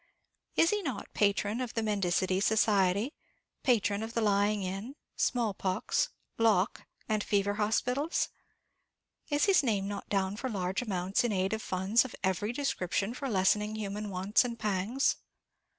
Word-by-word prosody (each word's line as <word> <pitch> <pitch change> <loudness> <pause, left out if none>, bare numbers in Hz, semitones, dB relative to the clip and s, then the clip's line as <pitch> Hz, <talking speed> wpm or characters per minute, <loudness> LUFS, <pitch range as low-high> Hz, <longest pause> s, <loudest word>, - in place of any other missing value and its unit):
Is 330 - +4
he 420 0 0
not 265 - -5
patron 205 +3 +1
of 245 -2 -4
the 225 - 0
Mendicity 190 -2 +1
Society, 205 - +2 0.5
patron 210 -5 +2
of 225 +1 -6
the 230 - +1
Lying 205 -1 +2
in, 195 +8 -5 0.2
Small 235 -5 +1
Pox, 185 -1 0 0.3
Lock, 215 -3 +2 0.2
and 215 -2 0
Fever 200 0 +1
Hospitals? 250 - 0 1.0
Is 290 -1 +2
his 390 -2 +5
name 205 -7 0
not 205 0 -6
down 195 0 0
for 260 - -3
large 190 -2 -1
amounts 190 -3 0
in 240 - 0
aid 190 +1 0
of 220 - -2
funds 190 +5 +2
of 260 - -8
every 190 +3 0
description 230 -6 -1
for 270 +1 -4
lessening 210 +1 +2
human 210 0 -4
wants 195 +4 +2
and 235 -2 -4
pangs? 210 +6 0
210 Hz, 150 wpm, -30 LUFS, 195-235 Hz, 1.0 s, his